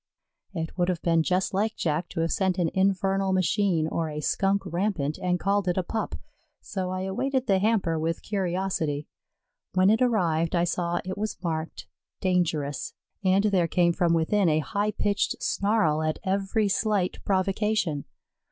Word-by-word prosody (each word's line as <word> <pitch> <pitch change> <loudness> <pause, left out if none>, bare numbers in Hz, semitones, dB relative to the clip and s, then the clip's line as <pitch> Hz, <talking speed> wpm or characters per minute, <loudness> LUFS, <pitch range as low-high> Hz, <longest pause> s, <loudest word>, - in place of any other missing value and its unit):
It 160 -1 -4
would 175 +1 +2
have 175 -3 -2
been 165 -1 +3
just 185 +4 0
like 215 +3 0
Jack 160 +1 -1
to 165 - -3
have 165 - 0
sent 190 -1 +1
an 170 -3 +1
infernal 195 0 +1
machine 185 -3 +2
or 160 0 -2
a 150 0 -5
Skunk 195 +6 +1
rampant 175 -5 -1
and 180 -1 0
called 200 +2 +1
it 180 - +1
a 185 - +1
pup, 220 +5 -3 0.4
so 190 -2 -4
I 185 0 -3
awaited 255 +8 -1
the 195 -1 +3
hamper 195 -6 +1
with 165 +1 -2
curiosity. 180 -6 -1 0.7
When 185 +2 +5
it 225 - +2
arrived 170 -9 +2
I 170 - +3
saw 175 0 -1
it 190 +2 -4
was 215 0 -3
marked 160 -1 -3 0.3
"Dangerous," 160 -7 -1 0.3
and 190 +1 +3
there 190 -5 +2
came 170 0 +2
from 170 -1 +2
within 175 +3 +2
a 155 - +3
high 210 -1 0
pitched 205 -1 0
snarl 200 -7 +1
at 155 0 -1
every 195 +3 0
slight 200 -2 0
provocation. 195 -5 0
185 Hz, 165 wpm, -26 LUFS, 165-200 Hz, 0.7 s, When